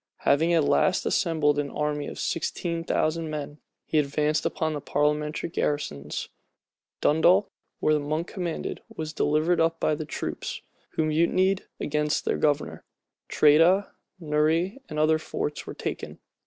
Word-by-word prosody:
Having 165 +5 +3
at 160 - +4
last 185 +5 +2
assembled 155 -5 +2
an 145 -1 -2
army 150 0 -2
of - - -7
sixteen 170 +1 -2
thousand 160 0 0
men, 150 -1 -5 0.3
he 155 - +2
advanced 150 +1 +1
upon 160 -1 -2
the 145 - -4
parliamentary 150 +2 0
garrisons. 140 - -2 0.7
Dundalk, 175 +6 +4 0.3
where 155 0 +3
Monk 155 +3 -2
commanded, 175 -3 -4
was 155 -1 -6
delivered 155 +4 +2
up 165 0 +1
by - - +2
the 150 +1 -3
troops, - - -5 0.3
who 160 - +1
mutinied 175 +5 +2
against 150 0 0
their - - +1
governor. 145 -1 0 0.5
Tredah, 165 +7 +5 0.3
Neury, 160 - +1
and 155 - -5
other 155 +1 +3
forts, 150 -1 -4
were - - -6
taken. - - -5
155 Hz, 140 wpm, -26 LUFS, 150-165 Hz, 0.7 s, Tredah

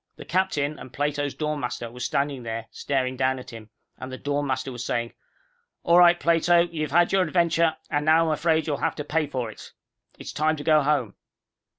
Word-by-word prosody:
The - - -11
captain 155 -5 -1
and 130 - -10
Plato's 145 0 -2
dorm 150 -1 -2
master 120 -2 -4
were 125 - -12
standing 140 +1 -1
there, 115 -1 -5
staring 130 -2 -2
down 130 0 +1
at 125 0 -10
him, 110 -2 -11 0.3
and 130 - -7
the 130 - -6
dorm 145 +1 -2
master 130 0 -2
was 120 -1 -6
saying, 120 -1 -2 0.7
"All 170 0 +5
right, 175 0 +6
Plato, 170 +1 +4
you've 165 -3 -2
had 175 +4 +3
your 195 - +3
adventure, 170 -2 +2
and 145 0 0
now 160 +2 +4
I'm 160 - +1
afraid 160 +1 +1
you'll 145 -3 -1
have - - -1
to 150 - -4
pay 155 +1 -1
for 125 -5 -4
it. - - -13 0.4
It's - - -8
time 155 +2 +1
to 145 - -7
go 155 -1 +4
home." 135 -7 0
145 Hz, 210 wpm, -25 LUFS, 130-160 Hz, 0.7 s, right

